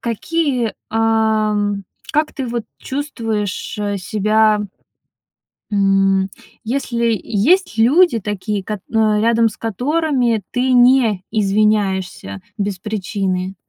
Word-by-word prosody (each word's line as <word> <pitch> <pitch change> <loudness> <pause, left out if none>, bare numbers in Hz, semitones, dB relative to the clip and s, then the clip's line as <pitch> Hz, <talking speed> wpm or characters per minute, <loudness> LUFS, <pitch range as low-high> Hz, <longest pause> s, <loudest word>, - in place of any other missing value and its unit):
какие, 250 0 -1 0.2
ам, 215 -2 +1 0.3
как 305 +1 +1
ты 270 - -4
вот 235 -1 -3
чувствуешь, 230 -8 -4
э, 205 -1 -1
себя 215 +2 +2 1.1
М, 195 -1 +2 0.3
если 235 -2 0
Есть 255 - +1
люди 255 +4 +4
такие, 205 0 -3
кот 210 -1 -4
а, 215 -1 +3
рядом 230 +1 +3
с 210 - -11
которыми 245 - 0
ты 255 +1 0
не 245 -6 +4
извиняешься 195 - 0 0.2
без 200 -2 -2
причины? 190 -2 -3
220 Hz, 100 wpm, -18 LUFS, 200-240 Hz, 1.1 s, люди